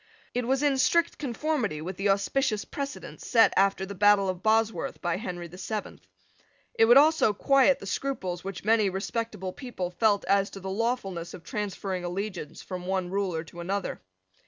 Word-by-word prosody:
It 245 -1 -1
was 265 +2 +1
in 280 -2 +2
strict 340 +5 +2
conformity 260 - -1
with 175 +4 -5
the 195 +2 0
auspicious 210 +3 +1
precedent 280 -1 -6
set 230 -3 +4
after 195 -1 +2
the 200 - -7
battle 200 0 +4
of 185 -1 -3
Bosworth 220 +1 +1
by 175 -1 -1
Henry 180 -4 -5
the 180 +2 -12
Seventh. 210 +2 -5 0.7
It 225 - +5
would 240 +3 +7
also 300 -6 +5
quiet 275 +5 +4
the - - -10
scruples 190 -5 -3
which 195 0 -6
many 215 -2 +4
respectable 195 0 -3
people 215 -9 -5
felt 205 +2 +2
as 200 0 +2
to 195 - -9
the 190 0 -5
lawfulness 195 -6 -2
of 170 - -12
transferring 195 -2 -4
allegiance 175 -3 -5
from 180 -1 -6
one 185 -2 -1
ruler 190 -5 -1
to 170 +1 -13
another. 195 +3 -3
200 Hz, 175 wpm, -27 LUFS, 185-230 Hz, 0.7 s, would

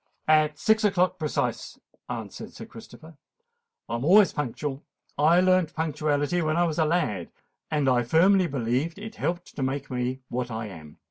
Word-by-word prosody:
"At 155 -1 +3
six 220 +6 +2
o'clock 185 -3 +2
precise," 155 -2 -2 0.3
answered - - -7
Sir - - -9
Christopher. 160 -1 -14 0.7
"I - - -5
am 120 - -5
always 195 +5 +6
punctual. 145 0 -4 0.3
I 160 +5 +4
learnt 185 -3 +2
punctuality 150 +1 0
when 155 0 0
I 175 - +4
was 165 -2 -1
a 160 - +4
lad; 150 - -1 0.4
and 150 -3 0
I 125 -2 +4
firmly 180 +9 +4
believe 135 +5 -1
it 220 +2 -9
helped 175 +1 -3
to - - -5
make 135 +1 -3
me 125 +1 -2
what 125 0 -3
I 110 -1 -5
am. 80 -5 -12
155 Hz, 170 wpm, -26 LUFS, 130-175 Hz, 0.7 s, always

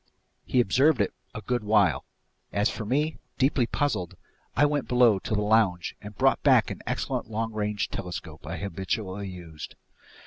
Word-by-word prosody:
He 130 - +1
observed 130 +6 +3
it 100 - +1 0.2
a 105 - -5
good 120 +1 -1
while. 105 -6 +3 0.5
As 105 +3 +1
for 110 - -5
me, 150 +7 0 0.2
deeply 135 -3 +2
puzzled, 120 -13 -1 0.4
I 145 - +5
went 145 -2 0
below 120 -5 +5
to 105 - -2
the 105 - +1
lounge 105 -5 +2
and 105 -1 -10
brought - - +3
back - - +4
an - - -7
excellent - - -2
long 110 +1 -2
range 105 -1 -1
telescope 80 -4 -6
I 85 +1 -4
habitually 95 +2 -3
used. 85 -4 -9
105 Hz, 165 wpm, -27 LUFS, 95-120 Hz, 0.5 s, I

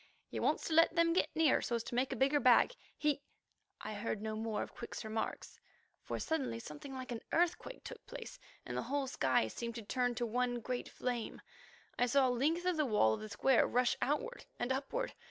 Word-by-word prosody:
"He - - -4
wants - - +1
to 325 - -1
let 330 +1 +5
them 335 0 +4
get 360 - +2
nearer 320 -4 +4
so 240 - -1
as 230 - -1
to - - -7
make 255 +2 +1
a - - -1
bigger 275 +2 +3
bag. 255 - +6 0.2
He——" 295 -2 +1 0.6
I - - -5
heard 210 0 -2
no 215 +1 -3
more 220 -1 -2
of - - -10
Quick's 235 -1 -7
remarks, 220 0 -4 0.4
for - - -4
suddenly 305 - -1
something 150 - -8
like 255 -1 -6
an 230 - -4
earthquake 350 +8 0
took - - -9
place, - - -8 0.3
and - - -5
the - - 0
whole 285 0 +1
sky 130 - +2
seemed 235 - -5
to 230 - -5
turn 245 +3 0
to 240 +1 -1
one 245 +1 0
great 245 +2 -3
flame. 245 -3 -3 0.6
I 245 - +4
saw 265 +2 +4
a - - +2
length 310 +8 +1
of 365 -2 +2
the 305 - +3
wall 210 - +4
of - - -3
the 215 - -6
square 250 +4 +4
rush 250 0 +2
outward 480 - -1
and 240 +2 -1
upward. 280 - -2
250 Hz, 215 wpm, -35 LUFS, 230-300 Hz, 0.6 s, bag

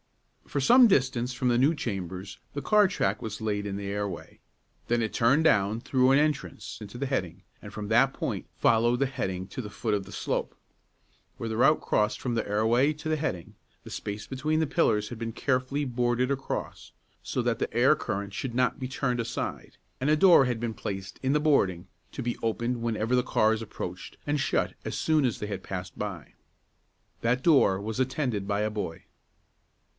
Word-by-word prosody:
For 145 - -2
some 245 - +7
distance 130 - +1
from 125 +1 -1
the 120 -1 +3
new 140 +5 +4
chambers 95 - -5 0.2
the 145 - -2
car 210 +3 +5
track 105 - -1
was 110 -1 -5
laid 105 -2 -2
in 100 -1 -3
the 100 0 -5
airway; 100 -3 -4 0.5
then 120 0 +2
it 110 - -2
turned 135 +7 +3
down 105 -5 +3
through 130 +1 +2
an 135 - +5
entrance 150 -1 -2
into 105 +3 -8
the 140 - -2
heading, 115 -11 -3 0.2
and - - -9
from 105 -1 -6
that 120 +5 +4
point - - -4
followed 120 +1 +3
the 140 - +3
heading 95 -8 -3
to 130 - -5
the 105 - -7
foot 105 +1 -2
of 100 -1 0
the - - -12
slope. - - -2 0.8
Where 115 - -4
the 110 - -3
route 135 +7 +4
crossed 105 0 +1
from 125 - -2
the 115 -2 -1
airway 115 +7 +2
to 150 +1 -8
the 155 - +2
heading, 105 - -3 0.3
the - - -10
space 105 0 -5
between 155 +4 -1
the 160 - +1
pillars 105 -10 +2
had 120 - -7
been 115 -1 -3
carefully 130 +4 -1
boarded 125 +1 0
across, 135 -1 -4 0.3
so - - -2
that - - 0
the - - -2
air - - +5
current 100 0 -4
should 120 +3 -4
not 125 0 +2
be 130 - -3
turned 125 -2 -1
aside; 115 - -5 0.2
and 135 - +1
a 155 - +4
door 170 -5 +7
had 125 -2 -1
been 115 -1 -2
placed 95 -3 -6
in 130 - +2
the 150 - +3
boarding, 95 - +2 0.2
to 135 - -5
be 120 0 -2
opened 115 +2 -1
whenever 115 +1 0
the 125 - +3
cars 110 -3 +2
approached, 90 -4 -7
and 145 0 +1
shut - - 0
as - - -4
soon 155 -2 +2
as 120 - -1
they 105 - -4
had 100 -2 -5
passed 90 -2 -6
by. 100 -7 -5 0.9
That 125 +3 +1
door 135 - +5
was 110 +3 -4
attended 125 -6 -1
by 100 0 0
a 105 0 0
boy. 90 -5 -5
120 Hz, 200 wpm, -28 LUFS, 105-135 Hz, 0.9 s, some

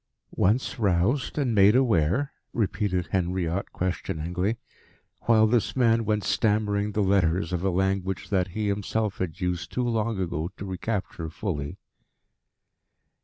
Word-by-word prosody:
"Once 115 +6 +1
roused 105 - +1
and 135 -5 +1
made 100 +1 +6
aware?" 120 - +2 0.2
repeated 100 -5 -1
Henriot 90 0 -1
questioningly, 90 +3 -2 0.7
while 110 -2 +6
this 115 0 +1
man 115 -3 +3
went 105 -1 0
stammering 105 -1 +1
the 105 - +1
letters 90 -2 +2
of 90 0 -1
a 95 - +2
language 95 -2 -1
that 95 -2 +2
he 105 +3 -3
himself 105 +1 -1
had 85 -4 -3
used 90 -2 -2
too 125 -1 -1
long 115 -2 0
ago 85 -2 -2
to 100 - -6
recapture 95 -3 -3
fully. 75 -5 -4
100 Hz, 130 wpm, -26 LUFS, 90-110 Hz, 0.7 s, made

